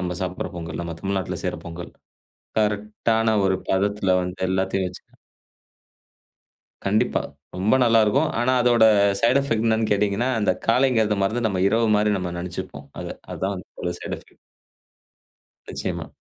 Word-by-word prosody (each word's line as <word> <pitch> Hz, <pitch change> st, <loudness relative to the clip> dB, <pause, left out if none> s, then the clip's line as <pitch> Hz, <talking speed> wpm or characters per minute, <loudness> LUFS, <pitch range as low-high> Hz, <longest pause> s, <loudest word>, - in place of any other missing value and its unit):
நம்ம 90 Hz, -1 st, -2 dB
சாப்டுற 90 Hz, 0 st, -3 dB
பொங்கல், 80 Hz, -1 st, -5 dB
நம்ம 85 Hz, -1 st, -5 dB
தமிழ்நாட்டுல 95 Hz, -2 st, -2 dB
செய்ற -, -, -1 dB
பொங்கல். 85 Hz, +1 st, -7 dB, 0.7 s
கரெக்ட்டான 110 Hz, +2 st, +1 dB
ஒரு 95 Hz, -1 st, +2 dB
பதத்துல 100 Hz, -1 st, +2 dB
வந்து 90 Hz, +1 st, -5 dB
எல்லாத்தையும் 95 Hz, 0 st, 0 dB
வெச்சு. 90 Hz, -, -10 dB, 1.8 s
கண்டிப்பா 105 Hz, +2 st, +1 dB, 0.3 s
ரொம்ப 100 Hz, +6 st, +2 dB
நல்லாருக்கும். 115 Hz, +6 st, +4 dB
ஆனா 125 Hz, +2 st, +2 dB
அதோட 120 Hz, -2 st, +5 dB, 0.4 s
சைடு 125 Hz, +4 st, +4 dB
எஃபெக்ட் 115 Hz, -5 st, 0 dB
என்னென்னு 110 Hz, -1 st, +1 dB
கேட்டீங்கன்னா, 105 Hz, +4 st, +1 dB
அந்த 105 Hz, -, +3 dB
காலைங்கிறத 115 Hz, -3 st, +3 dB
மறந்து 115 Hz, +4 st, 0 dB
நம்ம 95 Hz, -2 st, -1 dB
இரவு 115 Hz, +1 st, +2 dB
மாரி 105 Hz, 0 st, +2 dB
நம்ம 90 Hz, -2 st, -3 dB
நெனச்சிப்போம். 85 Hz, -5 st, -6 dB
அது -, -, -5 dB, 0.2 s
அதான் 95 Hz, +1 st, -2 dB
வந்து 90 Hz, -, -10 dB
பெரிய 90 Hz, -1 st, -2 dB
சைட் -, -, -4 dB
எஃபெக்ட். -, -, -22 dB, 1.3 s
நிச்சயமா. -, -, -4 dB
105 Hz, 135 wpm, -23 LUFS, 95-115 Hz, 1.8 s, அதோட